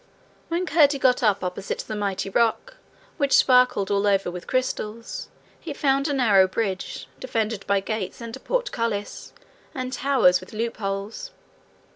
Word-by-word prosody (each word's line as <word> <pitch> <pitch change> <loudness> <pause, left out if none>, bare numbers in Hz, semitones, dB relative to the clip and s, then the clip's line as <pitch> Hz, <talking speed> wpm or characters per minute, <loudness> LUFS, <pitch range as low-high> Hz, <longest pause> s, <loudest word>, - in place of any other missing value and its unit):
When 340 +2 -1
Curdie 295 -3 +4
got 255 -2 +3
up 210 -5 +2
opposite 180 +2 -3
the 215 - -4
mighty 200 -2 -2
rock, 235 - 0 0.4
which 280 -3 +3
sparkled 250 -6 +4
all 200 0 +2
over 195 -3 +2
with 180 0 -8
crystals, 230 -3 -3 0.3
he 320 - -6
found 275 0 +1
a 290 - 0
narrow 210 -8 +5
bridge, 190 -1 -3
defended 225 -4 -2
by 200 -1 +2
gates 200 -2 -4
and 230 -1 -7
portcullis 230 - -2 0.4
and 255 -1 -4
towers 250 -9 +3
with 185 - -13
loopholes. 215 - -4
225 Hz, 140 wpm, -24 LUFS, 200-265 Hz, 0.4 s, narrow